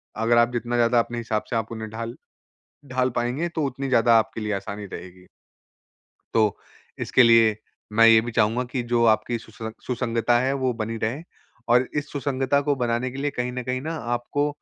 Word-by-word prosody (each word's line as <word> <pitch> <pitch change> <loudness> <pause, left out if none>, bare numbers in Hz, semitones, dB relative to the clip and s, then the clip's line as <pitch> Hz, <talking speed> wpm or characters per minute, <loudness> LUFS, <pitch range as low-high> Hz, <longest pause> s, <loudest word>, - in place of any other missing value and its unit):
अगर 115 +2 +2
आप 120 0 +4
जितना 120 0 -2
ज़्यादा 120 0 +3
अपने 120 0 -2
हिसाब 110 -2 -2
से - - -2
आप 115 0 -2
उन्हें 110 -1 -6
ढाल 115 +2 -6 0.7
ढाल 130 -1 0
पाएँगे 125 +8 -1
तो 160 -2 -2
उतनी 135 +1 -4
ज़्यादा 115 -2 +5
आपके 110 0 -2
लिए 105 -1 -2
आसानी 100 +1 -5
रहेगी। 90 0 -10 1.1
तो 110 -2 +3 0.4
इसके 125 - +4
लिए 115 -2 +5 0.4
मैं 115 +1 +6
ये 115 -1 +8
भी 120 +1 -5
चाहूँगा 115 +2 +2
कि 125 -3 -2
जो 120 -1 +3
आपकी 110 +2 +2
सुसं 110 0 -8 0.2
सुसंगता 120 -1 +1
है 130 +2 +1
वो 130 -1 +1
बनी 115 +1 -3
रहे। 120 +8 -1 0.5
और 125 +2 +4
इस 145 - -3
सुसंगता 140 -1 0
को 145 0 0
बनाने 120 0 -1
के 130 - -9
लिए 145 +1 -1
कहीं 125 -1 -3
न 125 0 -4
कहीं 130 +1 -2
न 150 - -7 0.3
आपको 145 +5 -1
120 Hz, 195 wpm, -24 LUFS, 110-130 Hz, 1.1 s, ये